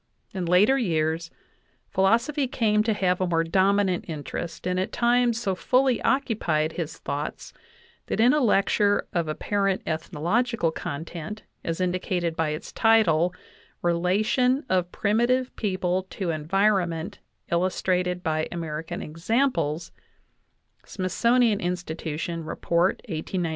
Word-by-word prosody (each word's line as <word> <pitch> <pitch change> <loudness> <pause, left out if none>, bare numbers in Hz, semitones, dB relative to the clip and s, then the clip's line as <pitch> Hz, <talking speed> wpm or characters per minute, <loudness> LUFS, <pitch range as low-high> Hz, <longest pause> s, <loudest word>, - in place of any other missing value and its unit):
In 185 -3 -3
later 205 +10 +4
years 165 -5 0 0.6
philosophy 235 +9 +2
came 215 -4 +2
to 220 0 +1
have 185 -3 0
a 185 - +1
more 165 -1 +2
dominant 190 +2 +2
interest, 160 +2 -6
and 180 0 0
at 185 - -2
times 240 -1 +2
so 200 -5 -1
fully 255 +5 +2
occupied 175 - +1
his 165 -3 -5
thoughts 145 +2 -5 0.5
that - - -2
in 240 +3 +6
a 300 - +3
lecture 205 -2 +3
of 170 -2 0
apparent 195 +5 -1
ethnological 170 +6 0
content, 165 +6 -6 0.2
as 165 +1 -3
indicated 180 -2 -1
by 160 -2 0
its 150 +2 -5
title, 180 -7 +3 0.5
"Relation 210 - +2
of 180 -1 +1
primitive 240 +5 +1
people 185 -2 -1
to 185 -4 -3
environ 190 +4 +2
ment, 170 +5 -6 0.3
illustrated 180 0 0
by 155 -1 0
American 160 -2 -4
examples" 170 - -1 0.9
(Smithsonian 230 +3 +1
Insti 175 -2 -3
tution, 165 +1 -4
Report 170 +3 +1
1895, 175 +1 -3
pp. 165 - -1
185 Hz, 125 wpm, -25 LUFS, 165-215 Hz, 0.9 s, in